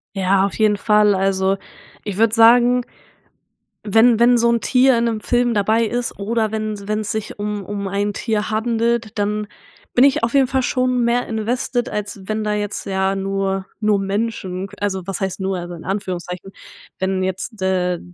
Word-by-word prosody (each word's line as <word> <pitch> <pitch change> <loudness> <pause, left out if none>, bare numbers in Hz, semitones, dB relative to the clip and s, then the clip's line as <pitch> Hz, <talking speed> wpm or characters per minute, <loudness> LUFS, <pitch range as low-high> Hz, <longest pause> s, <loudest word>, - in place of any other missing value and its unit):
Ja, 195 0 +2
auf 200 - -4
jeden 215 -2 +2
Fall. 210 -1 +3
Also, 190 0 +1 0.5
ich 200 -3 -5
würde 225 0 +3
sagen 245 +2 +5 1.0
wenn 225 +2 +4
wenn 240 +1 +5
so 235 0 +3
'n 235 -1 +1
Tier 255 +3 +4
in 235 - +1
'nem 225 -2 -1
Film 240 0 +1
dabei 215 +3 +2
ist, 240 0 -3
oder 220 +1 -1
wenn 215 -2 -4
wenn's 215 0 -2
sich 220 -1 -5
um 205 -1 -3
um 200 +1 -4
ein 200 +1 -1
Tier 215 0 -2
handelt, 230 0 0
dann 210 +1 -1 0.5
bin 245 - +6
ich 280 0 +2
auf 235 - 0
jeden 270 -2 +5
Fall 265 +1 0
schon 255 -1 0
mehr 240 +1 +1
invested, 240 +2 -2
als 205 -1 -5
wenn 215 +1 -2
da 210 - 0
jetzt, 205 -1 -3
ja 190 0 0
nur 195 0 -2
nur 210 -1 +2
Menschen 195 -2 -3
also, 190 -3 -2
was 195 -2 -3
heißt 190 -1 -3
nur, 190 0 -1
also 175 0 -6
in 165 - -9
Anführungszeichen, 185 -1 -4 0.5
wenn 190 0 0
jetzt, 190 +4 -4
äh, 180 -2 0
210 Hz, 180 wpm, -20 LUFS, 195-230 Hz, 1.0 s, bin